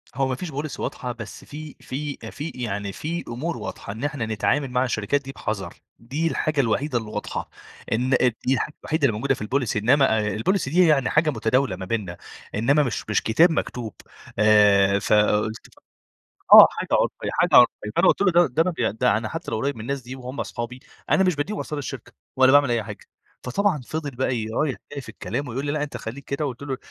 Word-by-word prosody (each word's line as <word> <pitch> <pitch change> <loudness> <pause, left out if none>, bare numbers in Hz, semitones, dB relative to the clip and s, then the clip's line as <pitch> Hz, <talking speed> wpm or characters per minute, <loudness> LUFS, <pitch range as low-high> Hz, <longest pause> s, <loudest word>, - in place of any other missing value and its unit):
هو 135 0 +1
ما 130 - -1
فيش 165 +4 -6
policy 145 +2 -5
واضحة 125 - -4
بس 115 -5 -9
في 150 0 -9
في 140 +2 -5
في 150 +3 -5
يعني 105 -5 -3
في 170 +3 -4
أمور 150 +8 -4
واضحة، - - -7
إن 115 +5 -8
إحنا 145 -5 -2
نتعامل 110 +6 0
مع 125 0 +2
الشركات 125 +2 0
دي 135 -1 -8
بِحَذَر، 105 -7 -4 0.3
دي 140 +8 -2
الحاجة 155 -2 -1
الوحيدة 125 +3 0
اللي 110 -2 -5
واضحة. - - -4 0.4
إن 125 +4 +1 0.4
دي 130 - +3
الحاجة 150 - -1
الوحيدة 155 -1 -2
اللي - - +1
الموجودة 135 +5 0
في 130 - -7
الpolicy، 125 -2 -1
إنّما 110 -5 +3
الpolicy 185 - 0
دي 175 +3 +4
يعني 140 -4 +3
هي - - +1
حاجة 155 0 +3
متداولة 115 -2 +1
ما 95 +1 -7
بيننا، 95 -4 -3 0.4
إنّما 140 +8 +3
مش 115 -4 -4
مش 105 - +1
كتاب 165 +10 +4
مكتوب. 120 - -3 0.5
آآ 100 -2 +5
فقُلت 105 +1 +1
له - - -24 0.8
آه. - - +10
حاجة - - -5
عُرفيّة، - - 0
حاجة - - +1
عرفية. 120 -3 +4
فأنا - - +5
قُلت - - +3
له: 200 - +4
"ده 175 0 +5 0.5
ده 125 +4 +1
أنا 110 - +1
ب 110 - -5
حتّى 165 +1 -6
لو 110 - -1
قريّب 140 +5 -1
من - - -9
الناس 140 +3 -3
دي 125 +2 -8
وهُم 130 +1 -5
صحابي، 120 +2 -6 0.3
أنا 190 - +4
مش 180 -3 +2
بادّيهم 195 +9 -3
أسرار 150 - -4
الشركة 140 - -7 0.2
ولا 130 0 +5
باعمل 145 -3 +5
أي 115 -2 +1
حاجة." - - -9 0.4
فطبعًا 175 +5 0
فضل 155 -2 -4
بقى 130 0 0
ي 110 -2 -3
رايح 135 +4 -1 0.2
جاي 145 - -5
في 130 - -13
الكلام 140 -2 -4
ويقول 135 +4 -4
لي: 145 - -1
"لأ 150 0 -1
أنت 145 -4 -4
خلّيك 120 +4 -7
كده." 140 +3 -3
قُلت 135 -1 -5
له: 135 -2 -3
130 Hz, 210 wpm, -23 LUFS, 110-145 Hz, 0.8 s, آه